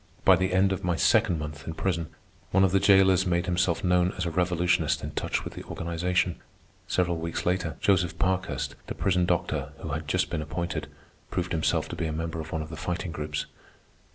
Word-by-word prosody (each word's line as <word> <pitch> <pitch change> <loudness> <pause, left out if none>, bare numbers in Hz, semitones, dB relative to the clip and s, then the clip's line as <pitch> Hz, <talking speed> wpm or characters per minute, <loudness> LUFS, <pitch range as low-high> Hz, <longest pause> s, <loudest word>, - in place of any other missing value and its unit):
By 95 - +8
the 95 +1 0
end 95 +1 +3
of 95 - -2
my 90 -1 +1
second 85 +1 +3
month 75 0 -7
in 80 - -4
prison, 85 -4 -1 0.4
one 95 +1 +4
of 95 - +4
the 95 - +4
jailers 95 -1 +5
made 85 0 +1
himself 90 -1 +1
known 90 0 +3
as 90 - -1
a 85 - -1
revolutionist 90 +1 +1
in - - -4
touch - - -2
with - - -7
the - - -8
organization. 85 +1 -1 0.5
Several 85 -2 +1
weeks 85 0 -3
later, 90 +2 0
Joseph 95 -2 +2
Parkhurst, 90 -8 -1
the - - -5
prison 90 -2 +1
doctor 90 -1 -1
who - - -7
had - - -3
just - - 0
been 85 -3 -1
appointed, 80 +3 -3 0.4
proved 90 0 -2
himself 80 -2 +1
to - - -5
be 80 - -2
a - - -2
member 80 +1 -3
of 80 0 -6
one 80 -1 -2
of 80 - -10
the 80 - -7
Fighting 90 0 -3
Groups. 75 -1 -3
90 Hz, 210 wpm, -27 LUFS, 80-90 Hz, 0.5 s, By